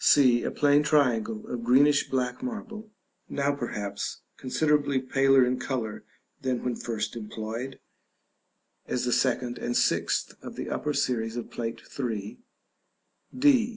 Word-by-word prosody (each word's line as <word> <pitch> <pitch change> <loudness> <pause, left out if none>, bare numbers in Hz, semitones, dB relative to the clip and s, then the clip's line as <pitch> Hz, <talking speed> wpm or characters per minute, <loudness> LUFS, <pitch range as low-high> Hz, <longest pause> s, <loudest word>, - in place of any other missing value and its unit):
c. 125 -4 +6
A - - -1
plain 145 0 +4
triangle 120 -8 +2
of 120 -1 -4
greenish 140 +4 +4
black 125 -1 -1
marble, 225 -3 -6 0.4
now 140 0 +1
perhaps 105 -7 -4
considerably 145 0 +1
paler 135 0 +4
in 125 +1 0
color 120 -5 -3 0.4
than 130 -2 -1
when 125 -1 -1
first 115 -1 -3
employed 115 +4 -5 1.1
(as 125 - -1
the 125 - +1
second 125 -1 0
and 120 - -1
sixth - - +1
of - - -8
the - - -5
upper 150 - -1
series 115 -2 0
of 120 - -6
Plate 115 -1 -4 0.2
III.). 110 - -3 1.0
d. 255 -4 +5
125 Hz, 135 wpm, -27 LUFS, 115-145 Hz, 1.1 s, c